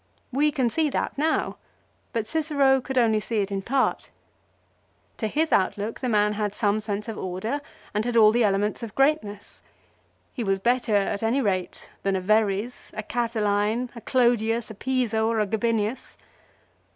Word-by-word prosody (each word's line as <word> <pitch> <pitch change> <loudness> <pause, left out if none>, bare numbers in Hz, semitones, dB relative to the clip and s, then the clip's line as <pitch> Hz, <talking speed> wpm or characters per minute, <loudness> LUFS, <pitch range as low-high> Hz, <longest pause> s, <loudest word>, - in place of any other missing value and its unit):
We 295 +4 +2
can 265 -5 +1
see 315 +2 +1
that - - -2
now; 315 +3 0 0.5
but 225 -2 -2
Cicero 280 -2 +2
could 265 +1 -5
only 225 -3 +4
see 225 +1 -3
it 200 0 -3
in 195 -1 -2
part. 260 +6 0 1.1
To 220 - -1
his 310 +8 0
outlook 205 +3 0
the 255 - -2
man 210 -1 +3
had 210 -1 -2
some 210 0 +1
sense 210 0 -4
of 225 - -5
order, 190 +10 -3 0.3
and 210 +1 0
had 240 0 0
all 215 -1 +7
the 240 +1 +2
elements 205 +2 +1
of 225 -3 -7
greatness. 270 -8 0 0.7
He 245 - -3
was 195 -2 +1
better 235 +1 +1
at 200 0 +1
any 230 +4 +1
rate 190 -7 -2
than 195 -1 0
a - - +1
Verres, 215 +3 0
a 215 - -3
Catiline, 225 0 0
a 235 - -8
Clodius, 235 -3 +1
a - - -7
Piso, 225 -1 0
or 225 -1 +1
a 210 - +2
Gabinius. 220 +2 -1
225 Hz, 170 wpm, -25 LUFS, 205-250 Hz, 1.1 s, all